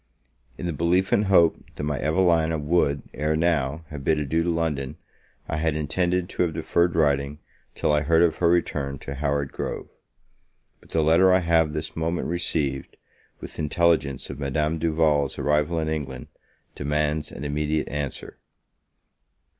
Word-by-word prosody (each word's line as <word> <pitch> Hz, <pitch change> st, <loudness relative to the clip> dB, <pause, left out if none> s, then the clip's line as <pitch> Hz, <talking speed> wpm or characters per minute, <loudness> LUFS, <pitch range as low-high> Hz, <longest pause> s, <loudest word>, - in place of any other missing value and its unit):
IN -, -, -5 dB
the 85 Hz, -, -1 dB
belief 85 Hz, +5 st, +1 dB
and 105 Hz, -, +3 dB
hope 85 Hz, -4 st, +5 dB, 0.2 s
that -, -, -5 dB
my 75 Hz, -2 st, -1 dB
Evelina 80 Hz, 0 st, +2 dB
would, 75 Hz, -2 st, +1 dB
ere 75 Hz, +1 st, 0 dB
now, 80 Hz, -2 st, 0 dB
have 75 Hz, -2 st, -7 dB
bid 80 Hz, +3 st, +2 dB
adieu 75 Hz, +3 st, 0 dB
to 85 Hz, -, 0 dB
London, 80 Hz, -5 st, -2 dB, 0.5 s
I -, -, -2 dB
had 80 Hz, -1 st, 0 dB
intended 90 Hz, +4 st, 0 dB
to -, -, -4 dB
have 85 Hz, -3 st, 0 dB
deferred 85 Hz, +1 st, +1 dB
writing, 70 Hz, -2 st, +1 dB, 0.4 s
till -, -, +1 dB
I 75 Hz, 0 st, +3 dB
heard 80 Hz, +2 st, +4 dB
of 85 Hz, -2 st, +2 dB
her 85 Hz, -, +3 dB
return 75 Hz, -5 st, 0 dB
to 70 Hz, -, -7 dB
Howard 70 Hz, 0 st, -1 dB
Grove; -, -, -5 dB, 0.9 s
but -, -, -22 dB
the 80 Hz, -, +1 dB
letter 85 Hz, +4 st, +5 dB
I 90 Hz, 0 st, +4 dB
have 80 Hz, -3 st, +2 dB
this 75 Hz, -, -5 dB
moment 80 Hz, +2 st, -2 dB
received, 75 Hz, -6 st, -2 dB, 0.4 s
with -, -, -9 dB
intelligence 75 Hz, -4 st, +1 dB
of 70 Hz, -, -8 dB
Madame 75 Hz, +3 st, -1 dB
Duval's 75 Hz, -3 st, +1 dB
arrival 75 Hz, +3 st, +1 dB
in 80 Hz, -1 st, -1 dB
England, 70 Hz, -5 st, -4 dB, 0.4 s
demands 75 Hz, +1 st, -1 dB
an -, -, -8 dB
immediate 75 Hz, +1 st, -1 dB
answer. 70 Hz, -1 st, -5 dB
80 Hz, 160 wpm, -25 LUFS, 75-85 Hz, 0.9 s, hope